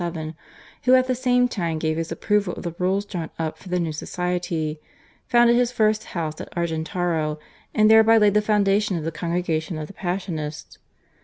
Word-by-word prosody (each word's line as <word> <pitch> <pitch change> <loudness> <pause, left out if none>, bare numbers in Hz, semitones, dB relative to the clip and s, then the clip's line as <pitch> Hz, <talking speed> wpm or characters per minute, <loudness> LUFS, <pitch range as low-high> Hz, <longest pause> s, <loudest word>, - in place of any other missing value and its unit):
(1727) 165 -2 -8
who 255 0 +7
at 255 - 0
the 255 - 0
same 250 0 +2
time 170 -8 -2
gave 155 0 -1
his 165 0 -3
approval 205 -3 0
of - - -8
the 170 -2 -4
rules 190 +3 +1
drawn 175 -5 -5
up 160 -1 -3
for 185 - -12
the 180 0 0
new 165 -2 -1
society, 170 -1 -3 0.5
founded 240 0 +5
his 245 0 +2
first 215 -2 +1
house 155 -2 -3
at - - -9
Argentaro, 160 -1 -1 0.4
and 215 0 +5
thereby 220 +1 +7
laid 210 -2 +4
the 210 - +4
foundation 205 -2 +2
of 160 - -4
the 165 - -2
Congregation 170 0 -2
of 155 - -4
the 200 - -12
Passionists. 175 -5 -5
180 Hz, 185 wpm, -23 LUFS, 160-210 Hz, 0.5 s, who